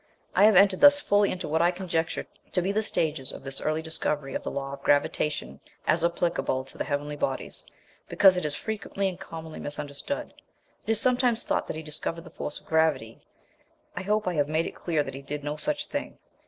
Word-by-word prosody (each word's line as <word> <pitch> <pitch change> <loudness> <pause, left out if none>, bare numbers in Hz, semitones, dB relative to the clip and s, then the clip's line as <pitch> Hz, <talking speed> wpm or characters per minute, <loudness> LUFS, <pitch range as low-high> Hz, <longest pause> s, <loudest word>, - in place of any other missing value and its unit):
I 205 - +6
have 215 -2 +6
entered 195 0 +5
thus 290 0 +9
fully 205 -6 +3
into 185 - -4
what 160 +2 +1
I 170 - +5
conjecture 175 -3 -2 0.3
to 180 - +2
be 190 - +1
the 215 +2 +1
stages 155 -9 -1
of - - -10
this 135 0 -2
early 155 +1 -1
discovery 150 -3 -2
of - - -2
the - - -4
law 135 0 -4
of 140 - -8
gravitation, 145 - +1 0.3
as 165 +1 +2
applicable 170 -6 0
to 135 - -14
the - - +1
heavenly 145 +1 -2
bodies, 135 -2 -3 0.4
because 190 -2 +6
it 180 - -1
is 150 -1 -1
frequently 205 -2 -2
and 185 -2 -4
commonly 160 -1 -8
misunderstood. 145 - -5 0.5
It - - -5
is 225 -1 +4
sometimes 245 -1 +2
thought - - -1
that - - -4
he 160 - -6
discovered 160 +2 -4
the 165 - -12
force 150 - -5
of - - -24
gravity; 155 -8 +1 0.7
I - - -3
hope 210 +1 0
I 180 - +1
have 145 -3 +1
made 160 +2 +1
it - - -5
clear 160 -4 0
that 135 - -7
he 135 - -7
did 145 +1 -5
no 145 +1 -2
such 295 - -1
thing. 285 -1 -5
160 Hz, 215 wpm, -27 LUFS, 145-195 Hz, 0.7 s, thus